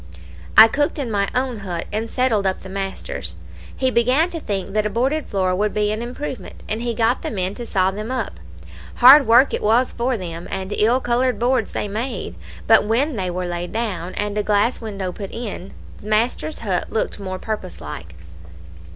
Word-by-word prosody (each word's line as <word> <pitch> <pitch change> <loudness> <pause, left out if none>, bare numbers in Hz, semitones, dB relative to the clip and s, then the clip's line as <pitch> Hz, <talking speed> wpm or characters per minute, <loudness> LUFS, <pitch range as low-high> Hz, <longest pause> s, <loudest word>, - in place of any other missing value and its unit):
I 225 - +12
cooked 290 +7 0
in 265 -6 -2
my 200 -1 +1
own 255 -3 -1
hut, 175 -4 -4
and 220 +2 -2
settled 225 -6 +1
up 190 - -1
the 190 - -10
master's. 195 0 -5 0.4
He 260 -1 +1
began 255 +9 +3
to 330 - -4
think 195 -7 -4
that 215 0 +1
a - - -3
boarded 265 +8 0
floor 185 -2 0
would 210 +2 0
be 210 0 +1
an 215 +1 -3
improvement, 245 -3 -6
and 220 +2 -2
he 235 -1 -2
got 230 +2 +2
the - - -3
men 185 -2 -2
to 235 +2 -7
saw 190 -1 +2
them 215 +3 -6
up. 245 - -3 0.6
Hard 270 +3 +8
work 240 +4 +6
it - - -1
was 235 +4 +3
for 245 +1 -1
them; 170 -3 -6
and 190 +1 -4
ill 235 +5 +3
coloured 250 +1 +1
boards 245 -2 +1
they - - -2
made; 215 - -4 0.3
but - - +6
when 245 +7 +1
they 185 -3 -2
were 180 +1 -3
laid 175 0 -4
down, 185 -6 -3
and 205 0 -2
a - - +3
glass 210 +4 +1
window 200 -4 -4
put 195 +1 -7
in, 210 -5 -6 0.3
the 205 - -10
master's 230 +8 0
hut 185 -3 -1
looked 220 - -2
more 185 -1 -4
purpose 210 - -5
like. 80 +2 -8
215 Hz, 200 wpm, -21 LUFS, 190-245 Hz, 0.6 s, I